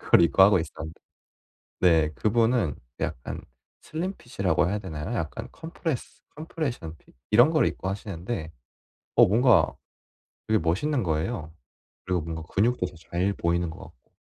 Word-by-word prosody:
그걸 - - +5
입고 85 +3 +5
하고 95 0 +7
있었는데 80 0 -6 0.8
네 80 -4 +4
그분은 110 - +2 0.2
약간 - - -4 0.4
슬림핏이라고 145 - -1
해야 105 - 0
되나요? 90 +2 -5
약간 80 -9 -4
컴프레스 160 -4 -5
컴프레션 145 - -4
핏 - - -25 0.2
이런 120 +7 +7
걸 155 -6 +3
입고 95 - -2
하시는데 95 -3 -4 0.6
어 - - +8
뭔가 120 +4 +4 0.7
되게 110 0 +3
멋있는 115 - 0
거예요. 80 0 -2 0.5
그리고 90 -1 0
뭔가 80 0 -5
근육도 110 -1 +2
더 90 - -11 0.2
잘 90 +3 +1
보이는 85 -1 0
것 80 - -11
같고. 60 - -15
95 Hz, 310 characters per minute, -26 LUFS, 80-120 Hz, 0.8 s, 어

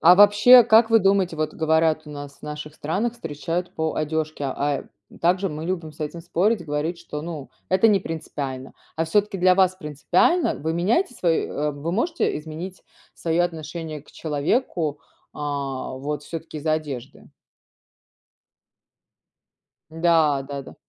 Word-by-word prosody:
А 175 +2 +8
вообще 205 +5 +8
как 225 +1 +5
вы 225 - +7
думаете? 195 -4 +2
Вот, 155 0 -2
говорят, 160 0 +2
у - - -9
нас, 145 -1 -9
в - - -31
наших 150 0 -7
странах, 200 +12 -1
встречают 170 -3 -4
по 160 0 -1
одежке, 155 -1 -2
а, 140 +1 -1 0.3
м, - - -15
также 185 +3 +2
мы 155 +1 -6
любим 170 -4 -3
с 155 - -20
этим 155 +3 -4
спорить, 180 +3 0
говорить, 155 +3 -2
что, 150 -3 -7
ну, 160 -4 -7 0.2
это 190 +4 +4
не 200 -2 +4
принципиально. 135 -5 -5 0.2
А 165 - +1
всё-таки, 200 +4 +1
для 185 0 +5
вас 185 -1 +3
принципиально? 175 - +1
Вы 160 +2 -2
меняете 230 - +1
свои, 170 -5 +1
э 150 +1 -2
вы 145 +4 -4
можете 325 - 0
изменить 160 +5 -8 0.3
свое 170 +1 0
отношение 160 -2 -5
к - - -20
человеку, 155 - -1 0.3
а, 140 -3 -4
вот 145 +2 -4
всё-таки 165 -1 -7
из-за 155 +1 0
одежды? 150 -6 -5 2.6
Да, 160 -4 +3
да-да. 140 -1 -7
160 Hz, 150 wpm, -23 LUFS, 150-185 Hz, 2.6 s, А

